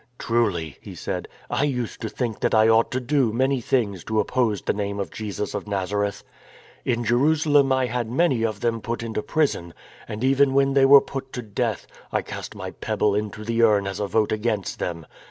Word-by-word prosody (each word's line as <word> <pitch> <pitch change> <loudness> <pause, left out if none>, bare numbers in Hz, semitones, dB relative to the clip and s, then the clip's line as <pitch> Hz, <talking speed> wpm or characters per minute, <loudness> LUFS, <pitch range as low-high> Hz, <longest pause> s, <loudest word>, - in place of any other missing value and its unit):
" - - -40
Truly," 95 - 0
he - - -10
said, - - -4
" - - -26
I - - +1
used 125 -6 -2
to 110 - -3
think 115 -2 -3
that - - +1
I 110 0 +6
ought 115 0 +4
to 130 - -1
do 130 -2 +1
many 130 +3 +1
things 105 -8 0
to 110 -1 0
oppose 110 -3 0
the - - 0
name 100 0 -3
of 100 - -3
Jesus 105 -1 -4
of 105 0 -4
Nazareth. 100 0 -2 0.6
In 120 -1 0
Jerusalem 145 +3 +3
I 130 -1 +3
had 120 -1 -2
many 130 -1 +2
of 110 -3 -1
them 115 -1 0
put 115 +1 -3
into 110 -2 -3
prison 135 - -1 0.2
— - - -21
and 105 +3 -5
even 135 0 +3
when 135 0 +3
they 135 -1 +5
were 140 0 +9
put 135 -1 -6
to 125 - -4
death, 105 -2 -2 0.3
I - - 0
cast - - -7
my - - -6
pebble 105 - 0
into 105 +1 -3
the 115 +1 0
urn 105 -3 +4
as 95 -1 -4
a 105 - -1
vote 110 +1 +1
against 110 -2 -1
them. 85 -2 -4
115 Hz, 215 wpm, -24 LUFS, 105-130 Hz, 0.6 s, were